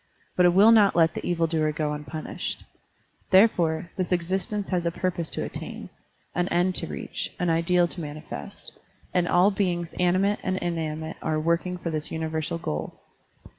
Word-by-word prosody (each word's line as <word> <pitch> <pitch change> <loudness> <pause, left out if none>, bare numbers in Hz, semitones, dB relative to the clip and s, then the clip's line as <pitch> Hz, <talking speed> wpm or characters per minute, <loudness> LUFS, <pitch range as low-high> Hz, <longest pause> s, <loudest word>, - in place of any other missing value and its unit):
But 180 -1 +5
it 175 - +4
will 210 +4 +8
not 210 -3 +6
let 165 -1 +4
the - - -5
evil 170 -1 +1
doer 155 -2 +1
go 150 -1 -1
unpunished. 150 +1 -5 0.7
Therefore, 175 -4 +4
this 185 -1 -2
existence 190 +3 -1
has 180 -2 0
a 170 - +1
purpose 170 -1 -2
to - - -3
attain, - - -7 0.4
an 175 +1 0
end 180 +1 +2
to 165 - -2
reach, - - -5
an 180 -2 +1
ideal 175 +2 +3
to 175 - -7
manifest; 145 - -7 0.4
and 175 -1 +2
all 180 +4 +5
beings 175 -4 -1
animate 185 +3 +2
and 185 0 -1
inanimate 160 -2 -3
are 155 -1 0
working 170 +3 0
for 170 -1 -4
this 155 -1 -2
universal 160 0 -2
goal. 75 - -4
170 Hz, 170 wpm, -26 LUFS, 160-185 Hz, 0.7 s, will